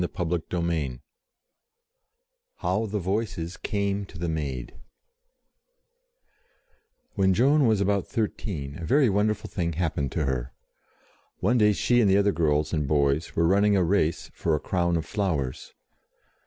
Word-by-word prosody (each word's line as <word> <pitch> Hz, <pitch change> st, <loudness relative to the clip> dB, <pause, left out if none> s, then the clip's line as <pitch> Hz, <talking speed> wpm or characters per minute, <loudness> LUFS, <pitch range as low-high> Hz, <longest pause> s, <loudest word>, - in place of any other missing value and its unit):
CHAPTER 90 Hz, -2 st, 0 dB, 0.2 s
II 80 Hz, -7 st, -2 dB, 1.6 s
HOW 110 Hz, +1 st, -1 dB
THE 105 Hz, +1 st, -3 dB
VOICES 95 Hz, -3 st, -2 dB
CAME 100 Hz, -1 st, -2 dB
TO 90 Hz, -, -12 dB
THE 85 Hz, +1 st, -3 dB
MAID 70 Hz, -6 st, -4 dB, 2.4 s
WHEN 95 Hz, -2 st, +2 dB
Joan 140 Hz, +4 st, +4 dB
was 110 Hz, -3 st, +3 dB
about 100 Hz, 0 st, +1 dB
thirteen 85 Hz, -9 st, -3 dB
a -, -, -6 dB
very 130 Hz, -, +3 dB
wonderful 105 Hz, +1 st, 0 dB
thing 85 Hz, -3 st, -2 dB
happened 75 Hz, -5 st, -1 dB
to 80 Hz, -, 0 dB
her. 65 Hz, -1 st, -2 dB, 0.8 s
One 120 Hz, +6 st, +2 dB
day 105 Hz, -1 st, +5 dB
she 120 Hz, +4 st, +2 dB
and 105 Hz, -, +3 dB
the 95 Hz, -, +5 dB
other 100 Hz, 0 st, +3 dB
girls 75 Hz, -3 st, 0 dB
and 75 Hz, -3 st, 0 dB
boys 70 Hz, +1 st, +1 dB
were 85 Hz, -, +2 dB
running 100 Hz, +3 st, +4 dB
a 95 Hz, -, +3 dB
race 85 Hz, -2 st, 0 dB
for 80 Hz, -2 st, 0 dB
a -, -, -1 dB
crown 85 Hz, 0 st, 0 dB
of 80 Hz, -, -3 dB
flowers. 80 Hz, -, -2 dB
90 Hz, 140 wpm, -26 LUFS, 80-100 Hz, 2.4 s, day